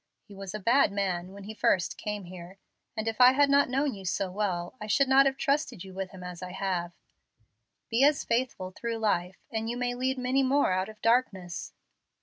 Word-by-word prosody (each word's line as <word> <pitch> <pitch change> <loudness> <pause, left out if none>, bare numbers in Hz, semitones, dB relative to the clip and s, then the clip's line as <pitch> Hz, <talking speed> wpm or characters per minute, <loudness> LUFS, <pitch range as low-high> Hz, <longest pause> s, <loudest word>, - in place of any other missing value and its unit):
He 205 - -13
was 195 0 -7
a - - -3
bad 235 +3 +3
man 185 -3 -2
when 200 0 -11
he 215 +2 -7
first 185 -4 +1
came 210 -1 -5
here, 180 +1 -11 0.4
and 220 +1 -2
if 225 +2 -1
I 250 +1 +9
had 280 +1 +4
not 280 -1 +4
known 270 +2 0
you 195 - -9
so 185 +1 -2
well, 180 -3 -2
I 210 - -5
should 275 +6 +3
not 270 +1 +6
have 270 0 -1
trusted 280 - -1
you 190 -1 -11
with 190 0 -4
him 185 -1 -11
as 180 -1 -8
I 180 0 -7
have. 180 -3 -2 1.0
Be 235 +4 +3
as 290 0 +4
faithful 230 -6 -1
through 230 +4 -4
life, 185 -4 0
and 225 0 -2
you 240 - -3
may 245 0 -1
lead 260 +2 -1
many 255 +2 +1
more 270 -3 +2
out 185 +2 0
of 215 -1 -13
darkness." 220 -7 0
210 Hz, 215 wpm, -28 LUFS, 185-255 Hz, 1.0 s, I